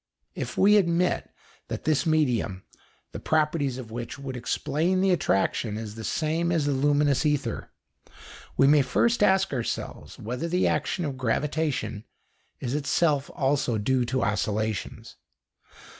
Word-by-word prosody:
If - - -5
we 210 +2 +6
admit 175 -2 +1 0.4
that - - -5
this 155 +1 +1
medium, 125 -11 +1 0.5
the - - -6
properties 150 -4 0
of 120 -4 -8
which 120 +3 -6
would 135 -2 -6
explain 150 +9 0
the 190 0 +3
attraction, 110 - 0
is 110 -2 -6
the 110 0 -8
same 165 +6 0
as 165 -4 +1
the 145 - +1
luminous 145 0 +2
ether, 150 -2 -1 0.9
we 135 - +5
may 145 +1 +6
first 220 - +1
ask 195 -3 +3
ourselves 120 -4 -4
whether 125 +9 -4
the 180 +2 +1
action 180 - -1
of 140 -3 -4
gravitation 130 -3 -1 0.6
is 125 -1 -3
itself 145 0 +1
also 135 -4 +1
due 125 +4 +1
to 130 +2 -1
oscillations. 105 0 -2
140 Hz, 140 wpm, -26 LUFS, 120-160 Hz, 0.9 s, we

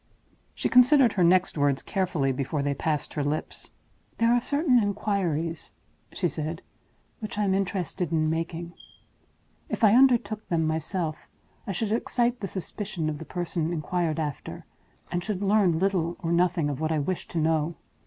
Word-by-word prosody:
She - - -1
considered 250 -1 +6
her 185 - +2
next 180 -2 +3
words 140 -1 +1
carefully 175 -8 0
before 140 +2 -2
they 140 0 0
passed 150 0 -2
her 150 - -1
lips. 145 +2 -4 0.5
"There 230 +1 +3
are 245 - +3
certain 285 -2 +3
inquiries," 175 -6 -1 0.4
she - - 0
said, 160 +2 -4 0.6
"which 215 -2 -6
I 210 - +1
am 195 -2 +2
interested 185 -3 -2
in 155 -1 +2
making. 165 +1 -3 1.0
If - - -3
I 210 -1 +7
undertook 240 -4 +3
them 165 -2 +1
myself, 160 +1 -2 0.4
I - - -1
should 205 +3 -2
excite 240 +2 0
the 195 - -3
suspicion 190 -3 -4
of 150 - -6
the 160 - -8
person 175 -2 -2
inquired 165 0 -1
after, 150 -4 -5 0.5
and 175 0 -1
should 205 -1 -3
learn 195 -4 +3
little 175 -2 0
or 165 - -1
nothing 170 -2 +2
of 145 -2 -3
what 160 0 0
I 160 - +1
wish 170 +5 -2
to - - -6
know. 160 0 +1
175 Hz, 165 wpm, -26 LUFS, 155-205 Hz, 1.0 s, I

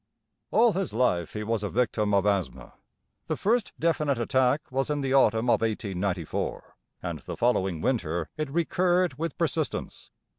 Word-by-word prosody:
All 230 -1 +4
his 185 - -2
life 90 -9 +1
he 105 - -3
was 110 0 -1
a 105 - -2
victim 110 -3 0
of 100 -1 +3
asthma. 100 -3 -1 0.5
The - - -1
first 225 +1 +1
definite 150 -4 +1
attack 130 +4 +1
was 135 +2 -1
in 145 -1 0
the 135 -1 -1
autumn 115 -3 +4
of - - +3
1894, 100 -6 -2 0.3
and - - -4
the - - -7
following 95 -9 +1
winter 85 -10 -1
it 155 -2 -3
recurred 175 0 +1
with 165 -2 -3
persistence. - - -2
125 Hz, 155 wpm, -27 LUFS, 105-150 Hz, 0.5 s, All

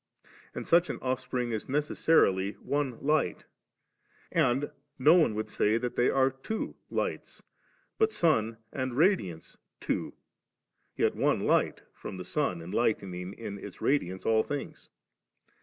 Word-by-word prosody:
And - - -4
such 170 +1 +4
an - - -3
offspring 130 -1 -2
is 110 -2 -3
neces 145 +2 -1
sarily 100 -11 +3
one 140 -4 -2
light; 150 - +1 0.9
and 140 -3 +2 0.3
no 145 +5 +6
one 160 -11 +4
would 110 0 -2
say 110 0 +1
that 120 +1 -3
they 120 - +3
are 135 0 +3
two 135 +12 -4 0.2
lights - - -3 0.3
«, - - -39
but 440 0 +4
sun 115 - +1 0.2
and 130 -2 -3
radiance 150 - +1 0.2
two, - - -2 0.8
yet - - +2
one - - +2
the - - -2
light - - +2
from 95 - -8
the 90 - -7
sun 90 - -1
enlightening 95 -2 -1
in 100 -3 -7
its 100 - -9
radiance 95 -10 0
all 110 -1 +4
things. 145 +3 -6
125 Hz, 145 wpm, -29 LUFS, 105-145 Hz, 0.9 s, no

